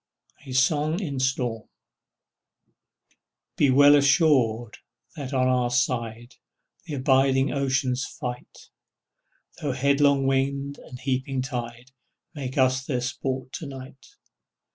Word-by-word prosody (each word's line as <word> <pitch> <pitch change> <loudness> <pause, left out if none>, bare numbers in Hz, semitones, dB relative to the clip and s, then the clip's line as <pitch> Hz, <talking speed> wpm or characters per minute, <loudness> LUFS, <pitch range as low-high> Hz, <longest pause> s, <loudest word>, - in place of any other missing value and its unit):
A - - -7
SONG 150 +5 +2
IN 145 -9 -4
STORM 125 -4 -2 1.9
Be 140 - +3
well 145 +2 +7
assured 135 -6 +2 0.4
that 140 -4 -6
on 130 -2 +1
our 125 -1 +1
side 120 -1 -2 0.5
The 155 -4 -5
abiding 135 0 +2
oceans 135 -2 0
fight, 125 -1 -8 0.9
Though 145 -3 -1
headlong 140 +1 +2
wind 140 +1 -1
and 125 - -11
heaping 130 0 -2
tide 120 -1 -6 0.4
Make 135 -4 -6
us 130 0 +2
their 130 -2 -2
sport 130 0 -4
to 155 - -6
night. 135 0 -11
130 Hz, 110 wpm, -25 LUFS, 125-140 Hz, 1.9 s, well